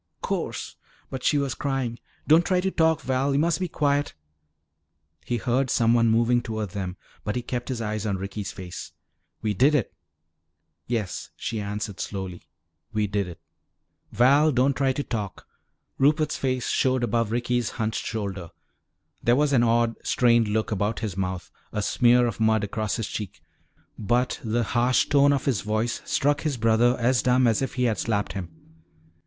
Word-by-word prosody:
"'Course!" - - -3 0.3
But 130 -1 -5
she 150 - +3
was 140 -2 0
crying. 135 -4 -2 0.3
"Don't 160 +3 +6
try 185 0 +1
to 190 +1 0
talk, 160 -2 +2
Val. 135 +1 0
You 140 - +2
must 165 0 +1
be 185 - -1
quiet." 145 - 0 1.1
He 120 - -1
heard 125 +3 0
someone 115 0 +3
moving 120 +2 +3
toward 110 -4 -4
them 95 -1 -4 0.3
but 105 - -2
he 125 - -2
kept 120 +1 -4
his 125 -3 -3
eyes 105 -1 -2
on 100 -2 0
Ricky's 100 +2 -5
face. 90 -2 -8 0.5
"We 105 -1 +1
did 135 +9 +4
it!" 130 - 0 0.9
"Yes," 110 -6 -3
she 115 - -4
answered 105 -1 -4
slowly, 95 -3 -5 0.5
"we 105 -1 0
did 100 -1 -1
it." 85 -2 -9 0.7
"Val, 140 +7 +4
don't 130 +1 +2
try 135 -2 +2
to 145 +2 -2
talk." 105 -7 -5 0.5
Rupert's 150 +3 +3
face 130 -2 -1
showed 130 -1 +1
above 115 -2 0
Ricky's 120 -1 0
hunched 110 0 -1
shoulder. 100 -6 -4 0.7
There 120 - +3
was 145 +1 +2
an 125 - +5
odd, 115 0 +2
strained 120 -2 +3
look 110 +1 -1
about 105 +2 -1
his 105 -6 -3
mouth, 95 -1 -3 0.2
a 105 - -2
smear 120 +3 +4
of 115 -2 -3
mud 110 -1 +3
across 105 0 -2
his 115 -3 -3
cheek. 105 -4 -6 0.6
But 120 +4 0
the 115 +1 0
harsh 120 +3 +2
tone 140 0 +5
of 140 -2 0
his 125 -8 +1
voice 110 +2 -1
struck 145 +2 +1
his 150 -5 -1
brother 115 +2 +3
as 120 -1 +2
dumb 125 +1 +3
as 115 -1 +2
if 135 - -3
he 125 - 0
had 115 -3 +1
slapped 105 -3 -1
him. 95 -4 -5
120 Hz, 170 wpm, -25 LUFS, 105-130 Hz, 1.1 s, Don't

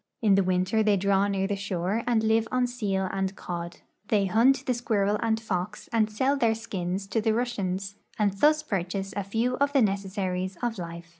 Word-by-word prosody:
In 210 -3 +5
the 195 0 +4
winter 185 +4 +1
they 210 -2 +3
draw 200 +1 +2
near 195 -1 0
the 200 +1 -1
shore 195 +1 -2
and 230 -2 +2
live 220 0 +2
on 255 -1 +2
seal 205 -6 -1
and 195 0 -2
cod. 170 -1 -6 0.3
They 205 -2 +2
hunt 255 +7 +3
the 255 - +1
squirrel 210 -4 0
and 220 -1 +1
fox 210 -1 -4
and 220 -2 +3
sell 260 +6 +1
their 230 -5 +2
skins 190 -4 -4
to 225 +3 0
the 220 0 +1
Russians, 200 -5 -2 0.2
and 205 -2 +2
thus 305 +8 +3
purchase 195 - -3
a 200 - -1
few 230 +6 -1
of 280 +1 +1
the 275 - +4
necessaries 190 -2 -2
of 230 -4 -1
life. 170 0 -7
200 Hz, 200 wpm, -27 LUFS, 190-225 Hz, 0.3 s, In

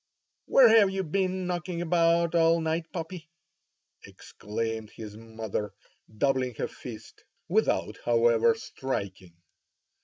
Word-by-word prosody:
"Where 260 -3 +7
have 220 -3 +6
you 190 0 -2
been 185 +2 -1
knocking 175 -1 -3
about 170 0 +2
all 165 0 +4
night, 160 0 -2
puppy?" 165 -2 -7 0.7
exclaimed 110 +1 -5
his 105 -2 -9
mother 110 -2 -5 0.4
doubling 130 -1 +1
her - - -2
fist, 115 -2 -11 0.2
without, - - 0
however, 120 - +4
striking. 100 - -5
160 Hz, 110 wpm, -28 LUFS, 115-175 Hz, 0.7 s, Where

